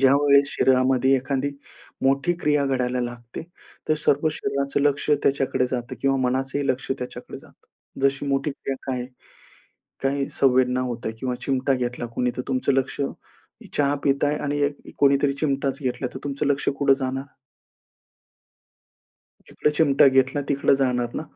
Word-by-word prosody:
ज्यावेळेस 140 +1 +5
शरीरामध्ये 130 0 +3
एखादी 135 +1 -1 0.5
मोठी 140 +6 +2
क्रिया 150 -2 +2
घडायला 125 -2 0
लागते 120 -1 -6 0.5
तर 155 - +4
सर्व 145 +3 +3
शरीराचं 140 -1 -1
लक्ष 145 +1 +1
त्याच्याकडे 135 -2 +1
जातं 125 0 -3
किंवा 135 0 +2
मनाचंही 135 +2 -1
लक्ष 130 +1 -2
त्याच्याकडे 125 - -7
जातं. - - -21 0.4
जशी 135 +1 +1
मोठी 140 +1 0
क्रिया 135 -1 -5
काय 130 -2 -2
आहे? 125 - -5 1.0
काही 140 0 0
संवेदना 130 -1 +2
होत 125 -2 -4
आहे 110 - -3
किंवा 125 -1 -2
चिमटा 135 0 0
घेतला 125 -1 -2
कुणी 125 0 +1
तर - - -1
तुमचं 130 0 +1
लक्ष 135 +1 -1 0.7
चहा 145 0 +2
पिताय 145 +1 +2
आणि 145 0 -1
एक 145 0 -6
कोणीतरी 140 0 +3
चिमटाच 140 -2 -1
घेतला 125 0 -2
तर - - -6
तुमचं 140 +1 -2
लक्ष 145 0 +1
कुठे 140 -1 +4
जाणार? 135 +1 -4 2.2
जिकडे 150 - 0
चिमटा 145 -3 +5
घेतला 130 +2 +2
तिकडे 140 -1 +3
जाणार 125 -3 0
ना? - - -3
135 Hz, 145 wpm, -24 LUFS, 130-140 Hz, 2.2 s, ज्यावेळेस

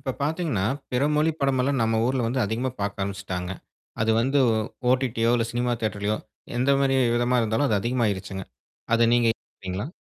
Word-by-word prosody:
இப்ப 130 -1 -3
பாத்தீங்கன்னா, 150 - 0 0.3
பிற 125 - +1
மொழி 155 +2 +3
படமெல்லாம் 135 -1 +1
நம்ம 115 0 +1
ஊருல 130 -1 0
வந்து 125 +3 0
அதிகமா 115 +5 -1
பாக்க 100 0 -2
ஆரம்பிச்ட்டாங்க. 95 -2 -4 0.5
அது 110 - +2
வந்து, 135 +4 +2 0.5
OTT 130 -2 +1
யோ 120 - +4
இல்ல 115 -1 0
சினிமா 120 0 0
தியேட்டர்லையோ, 105 0 -1 0.4
எந்த 130 +3 +2
மாரி 135 -1 +2 0.2
விதமா 120 +1 +2
இருந்தாலும் 110 +6 +1
அது 105 - +2
அதிகமாயிருச்சுங்க. 100 -5 -1 0.5
அத 115 0 +4
நீங்க 120 -1 +3
ஏத்துகிறீங்களா? 95 -1 -7
120 Hz, 160 wpm, -25 LUFS, 105-130 Hz, 0.5 s, யோ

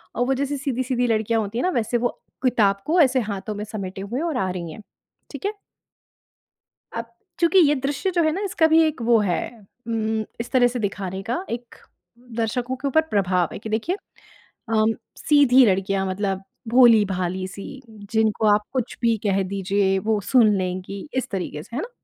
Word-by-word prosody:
और 245 - +1
वो 270 - +2
जैसे 280 +2 -2
सीधी-सीधी 255 -2 -1
लड़कियाँ 225 0 +1
होती 210 +2 -4
है - - -1
ना 365 - +2
वैसे 230 +2 0
वो 245 +1 +1 0.3
किताब 210 -6 +2
को 340 +4 +2
ऐसे 260 -3 +4
हाथों 200 +2 -5
में 205 - -4
समेटे 195 -3 -6
हुए 215 +6 -4
हैं 325 - -1
और 310 -6 -2
आ 190 -6 0
रही 170 -3 -5
है, 155 - -10 0.5
ठीक 285 +5 -7
है। 410 - 0 1.4
अब 230 0 -5 0.3
चूँकि 345 +2 +4
ये 295 - +3
दृश्य 280 +6 -1
जो 345 -2 +1
है 315 - +3
ना 370 - -3
इसका 365 -4 +2
भी 320 +1 +5
एक 310 -5 -2
वो 230 0 +4
है 185 -4 0 0.5
उम, 220 -1 -1 0.2
इस 235 - -4
तरह 255 -2 +5
से 245 0 -4
दिखाने 195 -2 -3
का 245 - -3
एक 240 +1 -6 0.6
दर्शकों 240 +3 -1
के 275 +2 -2
ऊपर 295 +4 +4
प्रभाव 185 -4 +1
है, - - -6
कि 220 - -8
देखिए 230 - -1 0.7
अम, 220 0 +3 0.2
सीधी 270 -4 +5
लड़कियाँ 195 -1 +1
मतलब 195 0 -2 0.3
भोली-भाली 195 -7 +4
सी 205 +8 -9 0.3
जिनको 220 -1 +2
आप 210 - -1
कुछ 255 -4 -2
भी 230 -2 +2
कह 195 0 +2
दीजिए 195 0 0
वो 215 +1 0
सुन 220 0 +4
लेंगी 185 +3 -4
इस 260 0 -1
तरीके 180 -6 -4
से, 235 - -11
है 270 - -1
ना। 460 - -6
225 Hz, 190 wpm, -23 LUFS, 195-260 Hz, 1.4 s, भी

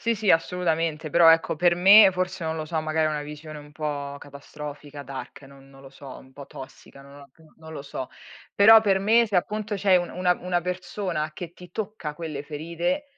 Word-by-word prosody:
Sì, 230 0 0
sì, 210 -2 0
assolutamente. 165 -2 0
Però, 170 +1 +6
ecco, 165 -1 +3
per 175 +2 +3
me 195 +3 +7
forse 185 -1 -3
non 160 0 -3
lo 155 - -4
so, 160 0 -3
magari 155 0 0
è - - 0
una 150 -1 -3
visione 150 +1 -9
un 145 0 -14
po' 145 -2 -5
catastrofica, 145 0 -10
dark, 135 +1 -9
no 135 0 -16
non 135 0 -18
lo 135 - -13
so, 135 -1 -11
un 130 - -18
po' 140 0 -11
tossica, 135 +1 -13
non 140 +1 -15
lo 140 -1 -15 0.3
non 160 0 -12
lo 145 - -7
so. 130 -2 -7 0.5
Però, 220 +2 +8
per 200 -3 +1
me 225 +4 +3
se 205 - -8
appunto 210 +3 -2
c'è 195 -1 +3
un 175 -1 -1
una 180 0 +1
una 180 -1 -1
persona 180 -3 -4
che 170 +1 -8
ti 180 0 -15
tocca 205 -8 -5
quelle 150 -3 -6
ferite 170 - -3
160 Hz, 210 wpm, -24 LUFS, 145-180 Hz, 0.5 s, Però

